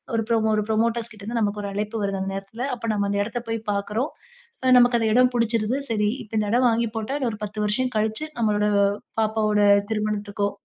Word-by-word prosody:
ஒரு 225 - +1
புரோ 230 - +3 0.2
ஒரு 210 - +1
புரமோட்டர்ஸ் 230 +1 0
கிட்ட 200 -2 -13
இருந்து 230 +2 -2
நமக்கு 205 0 -1
ஒரு 200 - -4
அழைப்பு 210 +2 -3
வருது 195 -1 -1
அந்த 195 0 -3
நேரத்தில. 225 +7 -5
அப்ப 230 -1 -5
நம்ம 200 -1 0
அந்த 200 - 0
இடத்த 235 +2 -4
போய் 225 0 -1
பார்க்கிறோம், 210 +7 -1 0.6
அ 255 - +5
நமக்கு 245 -1 +4
அந்த 220 -1 +1
இடம் 250 0 +4
புடிச்சிருது, 230 +2 +1
சரி, 210 -1 +1
இப்ப 220 +1 -9
இந்த 210 -1 -1
இடம் 250 0 +4
வாங்கி 230 0 +1
போட்டா, 225 +6 -3
இன்னும் 245 -4 0
ஒரு 210 - -10
10 210 +1 -7
வருஷம் 250 +4 0
கழிச்சு, 220 +8 0
நம்மளோட 210 -2 +2 0.5
பாப்பாவோட 215 -1 +1 0.3
திருமணத்துக்கோ! 210 -1 -1
220 Hz, 210 wpm, -24 LUFS, 210-235 Hz, 0.6 s, அ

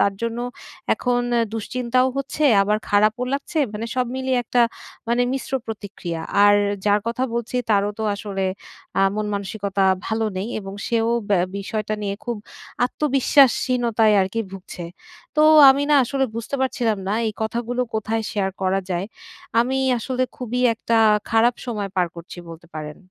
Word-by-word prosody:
তার 200 - +3
জন্য 230 0 -2 0.6
এখন 245 -1 0 0.2
এ - - +3
দুশ্চিন্তাও 250 +3 0
হচ্ছে 275 +2 -2 0.2
আবার 210 +1 +1
খারাপও 215 +4 +3
লাগছে। 280 +3 -2
মানে 215 +2 -4
সব 250 -1 +1
মিলিয়ে 260 -1 0
একটা 240 +1 +2 0.5
মানে 240 +1 +2
মিশ্র 270 0 -4
প্রতিক্রিয়া। 200 -6 -6 0.2
আর 205 - +7 0.3
যার 205 0 +3
কথা 235 +3 -1
বলছি 235 +1 -3
তারও 205 0 +3
তো - - -3
আসলে 200 -2 -3 0.6
আ - - +4
মন-মানসিকতা 200 -1 -2 0.2
ভালো 220 0 0
নেই 195 +5 -3
এবং 195 0 -8
সেও 230 -1 +1 0.2
ব্যা 185 -3 +4 0.2
বিষয়টা 215 +1 -3
নিয়ে 200 -1 -2
খুব 240 -2 -2 0.5
আত্মবিশ্বাসহীনতায় 250 -5 +3
আরকি 190 +4 -1
ভুগছে। 185 -2 -8 0.5
তো 305 - +5 0.3
আমি 275 +1 +2
না - - +6
আসলে 270 +2 0
বুঝতে 230 +4 -4
পারছিলাম 235 -5 0
না 205 - +1
এই 215 - -1
কথাগুলো 235 +3 -2
কোথায় 220 +1 -1
শেয়ার 200 -3 -1
করা 190 +1 +1
যায়? 180 +2 -1 0.5
আমি 260 +3 0 0.2
আসলে 255 +2 -2
খুবই 250 0 -3
একটা 230 +1 -1 0.3
খারাপ 230 +2 +4
সময় 205 -5 -3
পার 180 -1 +3
করছি 170 +1 -10
বলতে 165 +1 -12
পারেন। 150 -1 -6
225 Hz, 155 wpm, -22 LUFS, 200-245 Hz, 0.6 s, আর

